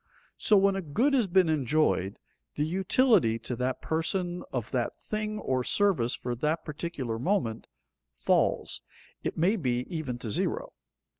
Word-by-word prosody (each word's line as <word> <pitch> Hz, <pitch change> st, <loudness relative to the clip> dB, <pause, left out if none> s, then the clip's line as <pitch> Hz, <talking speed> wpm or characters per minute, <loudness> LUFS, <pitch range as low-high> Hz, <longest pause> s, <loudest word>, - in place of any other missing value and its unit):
So, 210 Hz, -, +5 dB
when 195 Hz, 0 st, +4 dB
a 195 Hz, -, -1 dB
good 225 Hz, -, +1 dB
has 245 Hz, -6 st, +3 dB
been 185 Hz, -1 st, +4 dB
enjoyed, 145 Hz, -9 st, +1 dB, 0.4 s
the 150 Hz, -, 0 dB
utility 190 Hz, -, +3 dB
to 120 Hz, +2 st, -4 dB
that 125 Hz, +1 st, -2 dB
person 175 Hz, +2 st, -1 dB
of 120 Hz, -4 st, -3 dB
that 120 Hz, -2 st, -1 dB
thing 215 Hz, 0 st, -3 dB
or 130 Hz, -10 st, -1 dB
service 170 Hz, -10 st, +2 dB
for 125 Hz, -, -4 dB
that 155 Hz, +5 st, -1 dB
particular 145 Hz, -7 st, -4 dB
moment, 125 Hz, -, -1 dB, 0.5 s
falls, -, -, +1 dB, 0.4 s
it -, -, -3 dB
may 180 Hz, +7 st, +3 dB
be 125 Hz, -7 st, -1 dB
even 135 Hz, -6 st, -3 dB
to 120 Hz, -2 st, -5 dB
zero. 480 Hz, -, -1 dB
160 Hz, 150 wpm, -28 LUFS, 125-195 Hz, 0.5 s, So